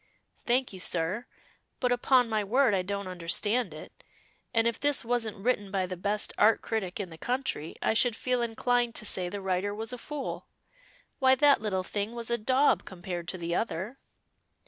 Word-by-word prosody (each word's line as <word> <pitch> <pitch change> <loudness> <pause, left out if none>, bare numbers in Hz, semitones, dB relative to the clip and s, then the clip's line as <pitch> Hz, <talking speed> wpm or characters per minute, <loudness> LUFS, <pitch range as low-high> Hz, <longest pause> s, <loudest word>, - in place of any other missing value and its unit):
"Thank 250 -1 +1
you, 190 - -8
sir. 180 +6 +1 0.5
But 250 -2 +1
upon 245 0 +4
my 215 -2 0
word 240 +3 +3
I 190 - +2
don't 200 +1 -4
understand 185 +7 +1
it, - - -12 0.5
and 230 -1 +2
if 235 -2 0
this 290 -4 +3
wasn't 230 -3 -1
written 205 -1 0
by 190 -1 0
the 185 0 -5
best 205 +4 -1
Art 220 +2 +5
critic 210 -5 -3
in 190 -4 -4
the 160 - -11
country 245 - -2
I - - +2
should 235 0 +3
feel 250 +1 0
inclined 240 +1 0
to 215 - -2
say 180 -3 0
the 200 +2 -5
writer 190 +2 -1
was 225 +3 -5
a 250 - -6
fool. 295 +1 -5 0.7
Why 260 -1 +5
that 285 -1 +5
little 190 -4 -1
thing 205 +4 -3
was 235 0 -4
a 235 - +1
daub 260 +6 +3
compared 175 -2 -6
to 185 - -3
the 170 -1 -3
other." 210 +5 -2
215 Hz, 190 wpm, -29 LUFS, 190-245 Hz, 0.7 s, Art